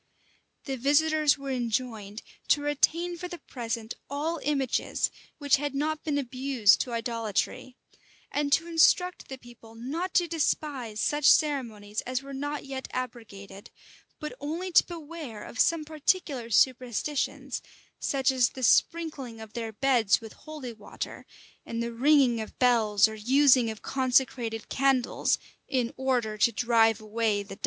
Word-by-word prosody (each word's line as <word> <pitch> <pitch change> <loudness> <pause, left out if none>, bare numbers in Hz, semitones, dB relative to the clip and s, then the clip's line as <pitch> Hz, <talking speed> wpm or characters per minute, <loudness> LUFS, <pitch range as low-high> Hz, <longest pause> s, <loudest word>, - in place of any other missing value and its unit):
The 270 -2 -4
visitors 300 +3 +3
were 275 -1 -5
enjoined 230 -4 -3 0.2
to 290 - +3
retain 335 +4 +1
for 360 - -4
the 350 - -7
present 230 -6 -5 0.2
all 305 +4 -2
images 275 -4 0 0.3
which 285 -2 +3
had 290 0 -3
not 305 +2 -1
been 295 -2 -1
abused 255 -4 +2
to 250 - -4
idolatry; 230 +2 -2 0.6
and 290 -1 -1
to 325 +3 +3
instruct 340 +2 +3
the 265 - -6
people 235 -2 -15
not 305 +11 -4
to 350 -1 +4
despise 285 -8 -2
such 295 +4 0
ceremonies 225 -9 +1
as 255 +1 -3
were 275 0 -9
not 290 +2 -4
yet 265 -1 -6
abrogated, 205 -6 -7 0.5
but 300 - -5
only 335 +6 -4
to - - +7
beware 315 -9 -8
of - - -9
some 330 -2 +3
particular 300 -5 -1
superstitions, 255 +4 0 0.4
such 270 -1 +1
as 255 -2 +3
the 260 - -8
sprinkling 280 -6 +1
of 220 -1 -11
their 225 -2 -4
beds 235 -3 +2
with 225 -2 -11
holy 300 -6 -8
water, 215 -2 -8 0.4
and 230 0 -4
the 235 0 -4
ringing 255 -2 +4
of 220 - -9
bells, 220 -5 +4
or 220 - -7
using 250 +2 +4
of 220 -1 -8
consecrated 250 -4 0
candles, 265 -2 +1 0.3
in 250 -3 -1
order 245 -5 -1
to 235 - +4
drive 225 -1 +3
away 215 -1 0
the 195 -1 -10
devil. - - -26
255 Hz, 145 wpm, -28 LUFS, 230-290 Hz, 0.6 s, to